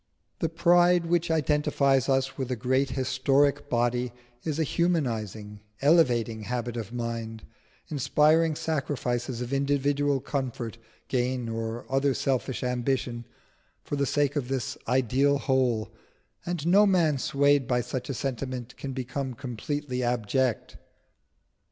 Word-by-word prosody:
The 165 - 0
pride 175 +1 +4
which 170 0 +1
identifies 150 -4 +2
us 135 0 +1
with 130 -2 -4
a 125 - 0
great 130 +3 +1
historic 135 +2 +1
body 120 0 0 0.3
is 155 -2 -2
a 160 - +2
humanising, 115 - -1 0.2
elevating 125 -8 +3
habit 120 0 -3
of 115 -2 -5
mind, 115 -2 -4 0.4
inspiring 155 +3 +3
sacrifices 130 -6 -2
of 125 +2 -4
individual 140 0 +1
comfort, 125 -4 -4 0.3
gain, 125 -1 -1
or 115 +1 -4
other 135 0 +1
selfish 130 -1 -1
ambition, 125 -1 -1 0.6
for - - -3
the 140 -1 0
sake 145 +1 +1
of 140 -4 -1
that 130 -3 -2
ideal 130 +3 +2
whole; 125 -6 0 0.6
and 175 -3 -2
no 200 +4 +6
man 165 -7 +3
swayed 140 -1 +2
by 125 -1 +2
such 125 +1 -5
a 135 - -2
sentiment 130 -2 -4
can 135 -1 -5
become 130 0 -4
completely 130 +2 -4
abject. 120 0 0
130 Hz, 125 wpm, -27 LUFS, 120-145 Hz, 0.6 s, no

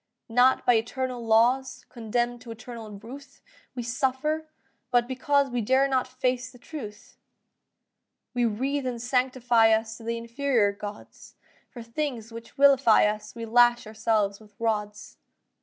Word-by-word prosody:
Not 250 +3 +3
by 245 - +5
eternal 250 +2 -3
laws 235 +4 +2
Condemn'd 240 +1 -2
to 245 - -12
eternal 225 0 -9
ruth, 255 +7 -12 0.3
We 245 - -4
suffer; 270 +6 -1 0.4
but 240 -1 +2
because 275 +1 +1
We 245 -1 -1
dare 260 +5 +3
not 260 -2 0
face 255 0 -2
the 250 - -16
truth. 240 -6 -10 1.2
We 245 -1 0
wreath 265 +5 -1
and 245 -2 -3
sanctify 245 -2 +2
us 220 0 -1
To 230 - -13
the 230 +1 -2
inferior 235 -2 +1
gods; 205 0 -10 0.3
For 240 - -10
things 230 -2 -4
which 230 0 -10
vilify 275 -6 +5
us 210 +2 -3
We 230 -1 -5
lash 240 +1 +4
ourselves 215 -2 0
with 210 -2 -19
rods. 210 -2 -3
240 Hz, 140 wpm, -26 LUFS, 225-260 Hz, 1.2 s, by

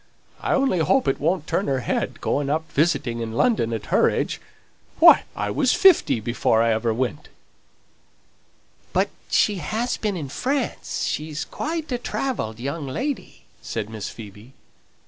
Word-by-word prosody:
I - - 0
only 265 -10 +2
hope 260 +11 +2
it 135 - +1
won't 165 +2 0
turn 195 - -1
her 135 -2 0
head; - - -2
going 140 -1 0
up 155 +1 -2
visiting 145 -6 +1
in 115 -1 -4
London 120 - +2
at 110 -2 -4
her - - +5
age. - - -2 0.6
Why, - - +7
I 105 0 -2
was 250 - +2
fifty 375 - +5
before 115 0 +1
ever 115 0 +1
I - - +2
went!" 125 +2 -3 1.6
"But - - +2 0.2
she 205 - +3
has 220 +9 -2
been 210 -4 -2
in 145 -5 -5
France; 265 - -2
she's 155 0 -3
quite 315 -1 -4
a 245 - -1
travelled 225 - -3
young 140 +3 -4
lady," 265 - -4 0.2
said 105 +1 -4
Miss 110 -2 -5
Phoebe. 110 +3 -12
145 Hz, 155 wpm, -23 LUFS, -, 1.6 s, Why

